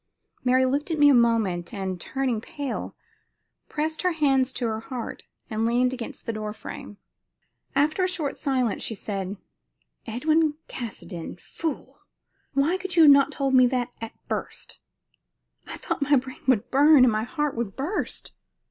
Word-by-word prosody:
Mary 255 +1 +4
looked 280 +5 0
at 325 - -1
me 290 -1 +7
a - - +6
moment, 225 -8 +2
and, 190 -3 -4
turning 260 -5 -1
pale, 280 +2 -5 0.7
pressed 315 +1 -2
her 365 -1 +1
hands 270 -4 +2
to 250 - -3
her 220 -1 -1
heart 240 0 -7 0.2
and 220 0 -2
leaned 245 +2 +2
against 255 +2 -7
the 230 - -2
door 215 -1 -4
frame. 210 -1 -9 0.8
After 305 +6 +2
a - - +3
short 315 -6 -2
silence 255 -6 0
she 225 - -3
said: 195 -1 -4 0.7
"Edwin 310 +6 +2
Caskoden 190 -8 -7
fool! 320 - -5 0.5
Why 290 +7 +2
could 375 -1 -4
you 325 -3 +8
not 280 -1 +7
have - - -10
told 275 -1 0
me 255 -1 +7
that 245 -1 -2
at 225 - -6
first? - - -5 0.9
I - - -6
thought - - -3
my 285 +1 +4
brain 260 0 -2
would 250 -6 +2
burn 285 0 +7
and 245 - +4
my 215 0 0
heart 295 +4 -2 0.2
burst." 315 +10 -3
260 Hz, 160 wpm, -25 LUFS, 230-295 Hz, 0.9 s, you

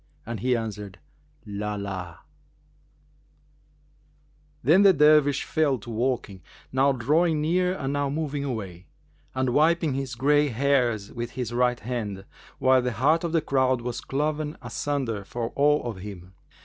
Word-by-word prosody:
and 115 -1 -5
he 125 +4 +1
answered 105 -4 -6 0.5
'Lб, 105 0 -4
lб!'"[FN#379] 90 -4 -6 2.5
Then 175 +6 +5
the 200 -2 +7
Dervish 150 -2 +4
fell 150 -4 +1
to 115 +1 -9
walking, 115 -5 -2 0.3
now 135 +2 +3
drawing 150 +6 +2
near 180 +4 +1
and 135 0 -3
now 145 -1 0
moving 145 -1 -2
away,[FN#380] 100 -10 -5 0.5
and 130 0 +1
wiping 160 0 +3
his 135 -2 -3
gray 145 +4 +3
hairs 120 -5 0
with 120 0 -5
his 125 -4 -4
right 125 0 +1
hand, 105 -5 -4 0.3
whilst 130 -1 +4
the 125 - -1
heart 150 - +2
of 170 - -2
the 165 -1 +2
crowd 130 -3 +1
was 120 0 -4
cloven 150 +2 -2
asunder 130 -8 -2
for 115 +3 -4
awe 150 +1 +3
of 115 -5 -5
him. 95 -2 -9
130 Hz, 145 wpm, -26 LUFS, 110-145 Hz, 2.5 s, the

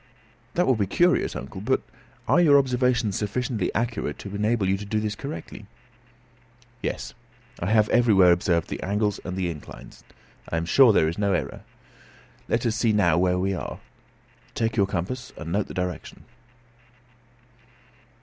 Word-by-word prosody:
"That 180 - +3
will 130 - +4
be 100 -3 0
curious, 175 - +2
uncle; - - -7
but - - +1 0.5
are 175 - +4
your 145 -4 +6
observations 125 -5 +1
sufficiently 110 -1 -2
accurate 115 -9 -2
to 100 - -8
enable 105 0 0
you 95 - +2
to 100 - -7
do 105 +1 -1
this 105 -1 -2
correctly?" 105 - -8 1.1
"Yes; - - -4 0.5
I 85 - -3
have 110 -1 +4
everywhere 100 -7 +5
observed 85 -1 +1
the - - -5
angles 105 +1 -1
and 90 +1 -5
the 95 -2 -1
inclines. 80 -4 -9 0.5
I 85 - -1
am 85 - -1
sure 125 +7 +6
there 80 -6 +3
is 85 +5 -3
no 100 -1 +1
error. 85 - -3 0.9
Let 115 +2 0
us 115 -2 +1
see 115 -2 +2
where 90 -2 +3
we 95 +2 0
are 95 - -4
now. - - -13 0.8
Take 115 -1 -1
your 100 -4 +3
compass, 100 +8 -4
and 85 0 -6
note 100 +3 0
the - - -9
direction." 90 -1 -5
105 Hz, 160 wpm, -25 LUFS, 90-120 Hz, 1.1 s, your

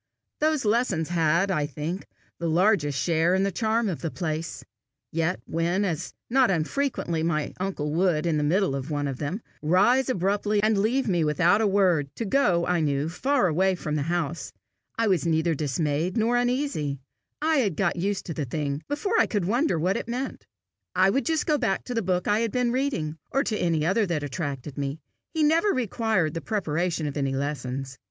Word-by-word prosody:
Those 305 -4 +1
lessons 210 -8 +1
had, 170 +3 +2
I 150 -5 0
think, 155 +7 -5 0.3
the 170 -1 -1
largest 165 -5 +2
share 170 +1 +2
in 190 - +2
the 200 - +1
charm 220 +3 0
of 180 -6 -3
the 165 - -2
place; 155 -6 -4 0.5
yet 165 +3 0
when, 170 +5 0
as 175 -2 -3 0.2
not 255 -1 +4
unfrequently, 170 - -1
my 155 -2 -1
uncle 180 -6 -2
would, 170 -2 +2
in 165 -3 +1
the 150 - 0
middle 180 +2 +2
of 135 +2 -4
one 145 -1 -1
of 135 -2 -4
them, 165 +10 -3 0.2
rise 205 - +3
abruptly 205 0 +1
and 215 0 +3
leave 245 +6 +1
me 175 -5 +2
without 170 +7 +3
a 220 - +3
word, 185 -8 +2
to 230 - -3
go, 185 -8 +2
I 180 -1 +1
knew, 145 -1 0
far 260 +8 +1
away 185 +3 +2
from 155 -3 -4
the 150 - 0
house, 165 -1 -2 0.5
I 230 - +2
was 185 -5 +2
neither 160 +1 +2
dismayed 150 - -1
nor 230 +2 +2
uneasy: 245 - 0 0.4
I 315 +1 +2
had 205 - +1
got - - +1
used 195 +3 -2
to 165 - -4
the 150 -2 -3
thing 140 +2 -3
before 390 +10 0
I - - +4
could 205 -5 -1
wonder 240 - +1
what 180 +6 +1
it 235 - -5
meant. 255 +3 -4 0.5
I 190 +1 +4
would 270 +3 0
just 320 -1 +1
go 300 -2 +2
back 195 - 0
to 250 - -5
the 230 - 0
book 180 -1 -1
I 205 +1 +3
had 230 -2 0
been 250 0 +1
reading, 235 - -1
or 275 +2 +1
to 215 - -1
any 165 -6 +1
other 200 +4 +2
that 160 -4 -1
attracted 145 -2 -4
me: 140 +2 -3 0.3
he 320 -1 0
never 325 +6 +3
required 220 - 0
the 165 - -4
preparation 175 -5 -1
of 145 - -3
any 135 -1 0
lessons. 135 -2 -4
180 Hz, 200 wpm, -26 LUFS, 155-220 Hz, 0.5 s, not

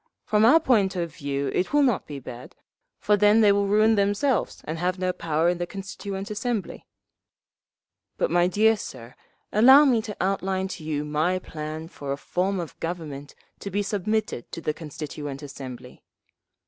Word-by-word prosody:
From 210 0 +3
our 295 +8 +7
point 210 -11 +2
of 170 -3 -3
view 140 -2 -3
it 185 - -1
will 295 0 +5
not 245 -8 +1
be 145 - -6
bad, 125 -2 -10 0.4
for 210 - +2
then 210 +2 +5
they 210 -2 +6
will 200 0 +2
ruin 215 +2 +4
themselves 205 +4 0
and 160 +1 -5
have 180 +2 0
no 185 0 -1
power 160 -1 0
in 175 0 +1
the 175 - -2
Constituent 195 +1 -6
Assembly…. 215 -2 -3 1.3
"But, - - 0
my 175 +1 +4
dear 220 +4 +4
sir, 120 - -9 0.4
allow 265 +7 +8
me 245 -5 +3
to 210 -2 -7
outline 190 0 -1
to 180 - -7
you 150 -1 -2
my 155 +5 0
plan 155 -2 -6
for 140 -4 -7
a 140 - -2
form 185 +5 -1
of 170 -3 -7
Government 155 -5 -6 0.2
to 200 - -6
be 205 +1 -1
submitted 205 - -2
to - - -4
the 155 -2 -2
Constituent 150 -2 -7
Assembly. 135 -3 -9
185 Hz, 175 wpm, -25 LUFS, 155-210 Hz, 1.3 s, allow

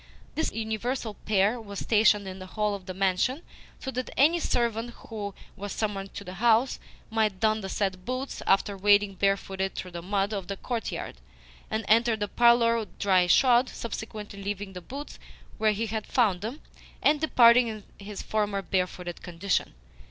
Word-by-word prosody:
This 320 - -1
universal 225 +1 -3
pair 210 +3 +1
was 200 -2 -8
stationed 210 -2 +3
in 190 0 -7
the 185 - -8
hall 210 +1 -1
of 195 -2 -7
the 185 - -4
mansion, 195 - +1 0.4
so 265 - -5
that 255 0 -3
any 320 +5 +5
servant 235 -5 0 0.2
who 205 -3 -5 0.2
was 205 +1 -6
summoned 200 -3 -3
to - - -6
the 180 -1 -8
house 235 +2 +3 0.3
might 215 -4 +1
don 220 0 +2
the 190 - -5
said 190 -2 -2
boots 255 +5 -4
after 200 +1 +3
wading 205 +1 +4
barefooted 195 0 0
through 180 - -6
the 170 -1 -6
mud 200 +3 -1
of 195 -3 -4
the 200 - -4
courtyard, 230 - -4 0.5
and 220 -1 -2
enter 230 +1 +4
the 205 -1 -2
parlour 230 -1 +4
dry 185 -3 +3
shod 245 +6 +5
subsequently 215 -3 -6
leaving 200 0 -4
the 180 - -7
boots 275 - -8 0.4
where 220 -1 +4
he 215 +2 -1
had 220 -1 -4
found 205 -8 +2
them, 235 +8 -5 0.4
and 295 0 +4
departing 245 -5 +6
in 215 -2 -6 0.2
his 200 0 -7
former 205 -2 -1
barefooted 180 -2 -2
condition. 175 - -1
210 Hz, 170 wpm, -27 LUFS, 195-230 Hz, 0.5 s, departing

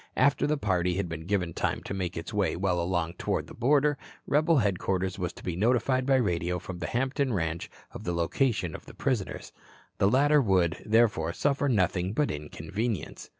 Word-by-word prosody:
After 140 - +3
the 150 0 +1
party 90 -7 0
had 100 -1 -1
been 80 0 -6
given 90 -4 0
time - - -1
to - - -5
make 95 -2 -3
its 80 - -6
way 105 -2 +1
well 90 -1 0
along 85 -1 -1
toward - - -1
the - - -12
border, 145 +3 +2 0.3
rebel 155 +2 +3
headquarters 95 -3 0
was 90 -1 -2
to - - -13
be 90 - -3
notified 125 +5 +2
by 135 - +5
radio 90 -7 0
from 90 0 -7
the 85 - -3
Hampton 130 +1 0
ranch 85 -3 -2 0.2
of - - -9
the 90 - -2
location 90 - 0
of - - -9
the - - -12
prisoners. 125 -8 -2 0.5
The 100 - +4
latter 145 +5 +4
would, 95 -6 +2
therefore, 105 -7 +3
suffer 145 +3 +1
nothing 95 -4 +1
but 145 +5 +1
inconvenience. 80 +8 -4
95 Hz, 190 wpm, -28 LUFS, 90-130 Hz, 0.5 s, by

